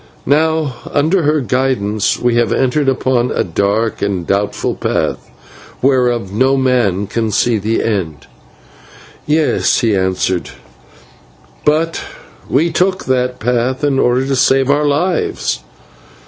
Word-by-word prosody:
Now, 155 Hz, -2 st, +1 dB, 0.2 s
under 160 Hz, +6 st, +2 dB
her 150 Hz, -1 st, +1 dB
guidance, 125 Hz, -6 st, 0 dB
we 120 Hz, -1 st, +1 dB
have 120 Hz, -3 st, +1 dB
entered 135 Hz, +2 st, +1 dB
upon 130 Hz, -2 st, 0 dB
a -, -, 0 dB
dark 100 Hz, +6 st, -1 dB
and 95 Hz, -4 st, -1 dB
doubtful 100 Hz, +3 st, -1 dB
path, -, -, -2 dB, 0.5 s
whereof 125 Hz, -6 st, +1 dB
no 130 Hz, +5 st, +2 dB
man 120 Hz, -7 st, +1 dB
can 110 Hz, +2 st, -2 dB
see 110 Hz, +2 st, +1 dB
the 110 Hz, +3 st, -1 dB
end." 90 Hz, -9 st, -3 dB, 1.0 s
"Yes," 150 Hz, -3 st, +2 dB
he 115 Hz, -4 st, +2 dB
answered, 95 Hz, -1 st, -1 dB, 1.2 s
"but 160 Hz, +2 st, +1 dB, 0.5 s
we 165 Hz, +5 st, +2 dB
took 185 Hz, +2 st, 0 dB
that 125 Hz, -1 st, 0 dB
path 125 Hz, +4 st, -1 dB
in 140 Hz, -2 st, +1 dB
order 125 Hz, +1 st, +2 dB
to 135 Hz, 0 st, -1 dB
save 135 Hz, +1 st, +3 dB
our 145 Hz, +1 st, +2 dB
lives." 145 Hz, -, -1 dB
125 Hz, 125 wpm, -15 LUFS, 105-145 Hz, 1.2 s, save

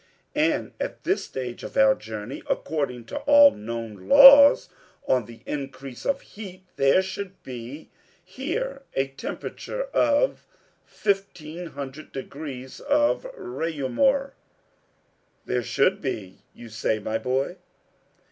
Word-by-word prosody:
"And -, -, 0 dB
at -, -, -5 dB
this -, -, 0 dB
stage 125 Hz, -2 st, -6 dB
of -, -, -7 dB
our 110 Hz, 0 st, +6 dB
journey, 110 Hz, +3 st, -7 dB
according 135 Hz, -6 st, -2 dB
to -, -, -6 dB
all 290 Hz, -1 st, +8 dB
known 110 Hz, -3 st, -7 dB
laws 280 Hz, +1 st, +9 dB, 0.4 s
on 125 Hz, -4 st, +2 dB
the 115 Hz, 0 st, -13 dB
increase 135 Hz, -3 st, -6 dB
of 280 Hz, -, 0 dB
heat, 190 Hz, -3 st, -11 dB
there 140 Hz, +7 st, +4 dB
should 195 Hz, 0 st, -7 dB
be 125 Hz, +4 st, -9 dB, 0.3 s
here 280 Hz, -, -4 dB
a 135 Hz, 0 st, 0 dB
temperature -, -, -5 dB
of 295 Hz, +11 st, +2 dB, 0.4 s
fifteen 180 Hz, -5 st, -3 dB
hundred 140 Hz, 0 st, -8 dB
degrees 135 Hz, -1 st, -7 dB
of 295 Hz, +11 st, +1 dB
Reaumur." 270 Hz, -, 0 dB, 1.1 s
"There 125 Hz, 0 st, 0 dB
should 185 Hz, -, +1 dB
be 105 Hz, -8 st, -5 dB, 0.2 s
you 120 Hz, -, -11 dB
say, 110 Hz, 0 st, -1 dB
my 110 Hz, +1 st, -3 dB
boy." 130 Hz, +1 st, -1 dB
140 Hz, 120 wpm, -25 LUFS, 125-205 Hz, 1.1 s, laws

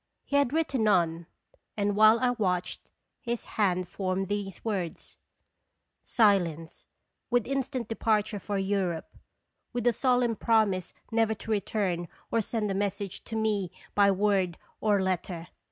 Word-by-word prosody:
He 285 Hz, -, -2 dB
had 285 Hz, -3 st, +3 dB
written 280 Hz, -8 st, +1 dB
on, 170 Hz, -4 st, +2 dB, 0.5 s
and 205 Hz, -1 st, +1 dB
while 215 Hz, +2 st, +7 dB
I 250 Hz, -1 st, +2 dB
watched, 185 Hz, -7 st, -2 dB, 0.3 s
his 240 Hz, -2 st, -3 dB
hand 185 Hz, -4 st, 0 dB
formed 190 Hz, 0 st, -2 dB
these 205 Hz, -2 st, -4 dB
words: 190 Hz, -7 st, -4 dB, 0.4 s
" -, -, -52 dB
Silence, 175 Hz, -8 st, +1 dB, 0.4 s
with 245 Hz, -2 st, +2 dB
instant 265 Hz, -3 st, -2 dB
departure 215 Hz, -2 st, 0 dB
for 200 Hz, +1 st, -3 dB
Europe, 190 Hz, -4 st, -1 dB, 0.6 s
with 240 Hz, -1 st, -2 dB
a 240 Hz, -, +4 dB
solemn 245 Hz, -1 st, +2 dB
promise 210 Hz, -6 st, +1 dB, 0.2 s
never 225 Hz, -1 st, +2 dB
to 220 Hz, -, -7 dB
return 195 Hz, -4 st, -1 dB, 0.2 s
or 230 Hz, -, +2 dB
send 215 Hz, -1 st, -2 dB
a -, -, 0 dB
message 200 Hz, 0 st, -3 dB
to 225 Hz, -, -6 dB
me 210 Hz, -5 st, 0 dB, 0.2 s
by 200 Hz, -1 st, +5 dB
word 195 Hz, -3 st, +1 dB, 0.2 s
or 210 Hz, -2 st, +3 dB
letter. 180 Hz, -2 st, -2 dB
205 Hz, 140 wpm, -28 LUFS, 185-225 Hz, 0.6 s, while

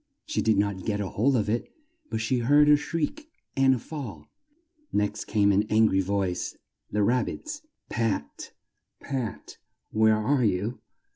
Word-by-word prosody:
She -, -, -1 dB
did 110 Hz, -2 st, +3 dB
not 100 Hz, -2 st, 0 dB
get 105 Hz, -2 st, -1 dB
hold 110 Hz, +7 st, +1 dB
of 110 Hz, -4 st, +1 dB
it, 115 Hz, +3 st, -1 dB, 0.4 s
but 110 Hz, -, -2 dB
she 120 Hz, +3 st, +1 dB
heard 145 Hz, +5 st, +5 dB
a 150 Hz, -, +8 dB
shriek 165 Hz, -, -3 dB, 0.3 s
and 135 Hz, -1 st, +4 dB
a -, -, -2 dB
fall. 115 Hz, -, -8 dB, 0.6 s
Next 105 Hz, 0 st, -1 dB
came 100 Hz, -1 st, +3 dB
an 100 Hz, +1 st, +4 dB
an 110 Hz, +1 st, +5 dB
gry 95 Hz, -3 st, +3 dB
voice 95 Hz, -2 st, -2 dB, 0.3 s
the 105 Hz, 0 st, +1 dB
Rab 125 Hz, +4 st, +2 dB
bit's 300 Hz, -1 st, -6 dB, 0.3 s
"Pat! 110 Hz, -11 st, -2 dB, 0.5 s
Pat! 130 Hz, -5 st, -5 dB, 0.3 s
Where 110 Hz, 0 st, +4 dB
are 125 Hz, +5 st, +1 dB
you?" 105 Hz, +3 st, 0 dB
110 Hz, 155 wpm, -27 LUFS, 100-135 Hz, 0.6 s, a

